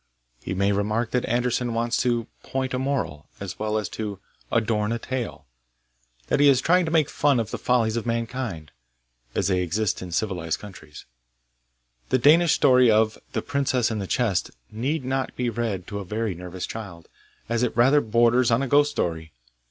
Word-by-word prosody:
He 95 - -4
may 100 +1 +2
remark 105 +3 0
that 125 - 0
Andersen 120 0 0
wants 115 +1 0
to 120 -2 +1 0.2
'point 130 -1 -3
a 130 - 0
moral,' 130 - -2
as 100 -2 -7
well 110 0 -1
as 105 -3 -2
to 105 -3 -5 0.3
'adorn 110 -2 +1
a 115 - 0
tale; 125 0 -5 0.4
' - - -39
that - - +1
he 145 0 +7
is 135 -3 +5
trying 180 +5 +3
to 160 - -3
make 160 -3 +3
fun 145 -4 +2
of 115 - -3
the - - -4
follies 115 -3 +1
of 115 0 -3
mankind, 115 - -3 0.6
as - - +1
they 90 -2 +1
exist 95 +4 -1
in 90 -1 -7
civilised 85 -3 -1
countries. 85 -8 -12 1.0
The - - +3
Danish 155 +6 +5
story 125 -4 +5
of 110 0 +3
'The - - -2
Princess 130 -4 0
in 110 - -2
the 95 - -4
Chest' 105 -8 0 0.2
need 130 +6 -2
not 130 0 -2
be 125 -1 -1
read 110 -5 -3
to 100 0 -5
a - - -5
very 105 +2 -2
nervous 90 +1 -6
child, 95 -7 -8 0.4
as 115 0 0
it 125 -1 -1
rather 135 +5 +5
borders 120 +2 +3
on 115 +3 +2
a - - -1
ghost 145 +2 +4
story. 80 - -3
115 Hz, 190 wpm, -24 LUFS, 100-125 Hz, 1.0 s, he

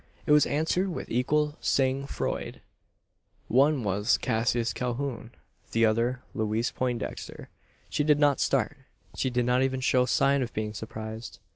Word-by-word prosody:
It 155 - 0
was 150 0 +6
answered 160 +6 0
with 175 - -6
equal 150 +5 +1
sang 135 0 +1
froid. - - -3 0.9
"One 135 +2 +3
was 105 +3 +2
Cassius 115 0 0
Calhoun 125 -1 -3 0.4
the 115 0 +4
other 120 +3 +1
Louise 110 +2 -1
Poindexter." 125 -3 -4 0.4
She 150 - -1
did 150 -1 +4
not 145 -2 +3
start. 135 +1 +1 0.4
She 130 - 0
did 125 -1 0
not 125 +1 +2
even 130 0 0
show 125 0 +2
sign 140 +1 +3
of 120 -3 -3
being 105 0 -2
surprised. 110 +1 -7
125 Hz, 145 wpm, -28 LUFS, 115-140 Hz, 0.9 s, was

